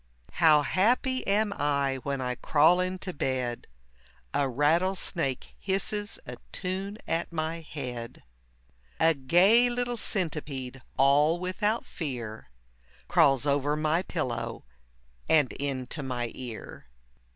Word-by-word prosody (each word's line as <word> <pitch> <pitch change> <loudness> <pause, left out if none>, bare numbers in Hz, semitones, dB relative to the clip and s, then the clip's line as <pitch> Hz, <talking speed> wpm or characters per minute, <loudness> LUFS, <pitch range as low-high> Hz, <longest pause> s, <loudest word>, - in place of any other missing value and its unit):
How 155 -3 +5
happy 245 - +2
am 205 +1 +2
I 140 -2 0
when 140 +1 -3
I 125 -1 -1
crawl 155 +7 +4
into 185 0 -2
bed, 130 -4 -2 0.7
A 140 -2 +1
rattlesnake 160 0 0
hisses 205 +2 -1
a - - -7
tune 195 +2 -4
at 165 +1 -1
my 160 0 -2
head, 125 -7 -7 0.8
A 165 0 +5
gay 185 - +5
little 245 0 -1
centipede, 145 - -2 0.2
all 145 +5 +4
without 205 +5 -1
fear, 120 - -6 0.6
Crawls 135 -1 +4
over 145 +1 +1
my 155 +2 +1
pillow 130 - -4 0.6
and 150 -5 +4
into 135 +1 -4
my 125 -3 -3
ear. 120 - -8
150 Hz, 110 wpm, -28 LUFS, 135-185 Hz, 0.8 s, How